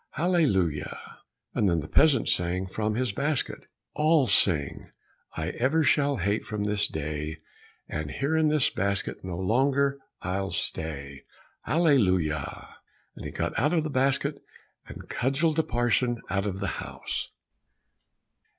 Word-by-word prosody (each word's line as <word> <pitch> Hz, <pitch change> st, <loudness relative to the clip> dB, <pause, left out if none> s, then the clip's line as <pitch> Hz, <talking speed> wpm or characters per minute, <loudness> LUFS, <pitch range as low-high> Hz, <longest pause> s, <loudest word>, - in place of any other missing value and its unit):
Hallelujah. 115 Hz, -, +1 dB, 0.6 s
And 100 Hz, -, +2 dB
then 85 Hz, -2 st, +1 dB
the 75 Hz, -, -6 dB
peasant 140 Hz, -, +4 dB
sang 90 Hz, +2 st, +1 dB
from 105 Hz, +3 st, -2 dB
his 125 Hz, -1 st, 0 dB
basket, 140 Hz, +5 st, -2 dB, 0.3 s
"All 155 Hz, -1 st, +3 dB
singing 85 Hz, -, +3 dB, 0.5 s
I -, -, -2 dB
ever 145 Hz, +6 st, +1 dB
shall 145 Hz, -2 st, +2 dB
hate 100 Hz, +2 st, 0 dB
from 105 Hz, -1 st, -4 dB
this 105 Hz, 0 st, +1 dB
day, 75 Hz, +1 st, -4 dB, 0.5 s
And 75 Hz, -1 st, -4 dB
here 140 Hz, -, -1 dB
in 160 Hz, -1 st, +3 dB
this 150 Hz, -3 st, +3 dB
basket 100 Hz, 0 st, -2 dB
no 90 Hz, -2 st, -5 dB
longer 140 Hz, +8 st, +1 dB, 0.2 s
I'll 95 Hz, +2 st, -2 dB
stay." 70 Hz, -6 st, -3 dB, 0.4 s
Hallelujah. 95 Hz, -, +1 dB, 0.4 s
And -, -, -9 dB
he -, -, -5 dB
got -, -, -2 dB
out 150 Hz, +8 st, +2 dB
of 160 Hz, -, +2 dB
the 155 Hz, -, -3 dB
basket, 135 Hz, 0 st, 0 dB, 0.5 s
and -, -, -10 dB
cudgelled 150 Hz, +5 st, 0 dB
the 160 Hz, -, +3 dB
parson 120 Hz, -1 st, +1 dB
out 100 Hz, +1 st, 0 dB
of 95 Hz, -1 st, -4 dB
the -, -, -1 dB, 0.2 s
house. -, -, -4 dB
110 Hz, 140 wpm, -27 LUFS, 90-140 Hz, 0.6 s, peasant